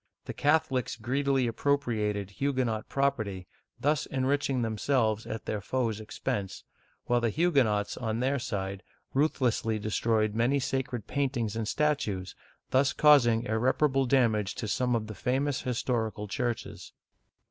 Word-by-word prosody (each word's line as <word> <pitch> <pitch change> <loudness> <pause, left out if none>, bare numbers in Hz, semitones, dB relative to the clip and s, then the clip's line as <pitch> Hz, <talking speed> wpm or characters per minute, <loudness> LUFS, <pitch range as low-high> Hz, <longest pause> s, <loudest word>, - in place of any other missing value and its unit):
The - - -5
Catholics 145 -5 +1
greedily 135 +3 0
appropriated 110 -6 0
Huguenot 125 -3 -1
property, 110 -9 -1 0.3
thus 150 +1 +1
enriching 135 -1 0
themselves 110 0 0
at 110 0 -5
their 105 - -2
foes* 115 -1 -1
expense, 100 -2 -4 0.4
while 120 0 +2
the 115 - +2
Huguenots, 125 -8 +1
on 110 -2 -2
their 135 +2 +1
side, 100 -5 -4 0.3
ruthlessly 125 -6 +1
destroyed 110 0 0
many 120 +5 +2
sacred 130 -4 -2
paintings 130 -6 -1
and 115 -1 -2
statues, 105 - -1 0.4
thus 135 +1 +3
causing 120 -7 +5
irreparable 130 +4 +1
damage 115 -6 +2
to 110 - -4
some 125 +3 +1
of 110 -2 -1
the 110 - -7
famous 130 +5 -1
historical 115 -4 -2
churches. 120 +3 -4
120 Hz, 125 wpm, -29 LUFS, 110-135 Hz, 0.4 s, causing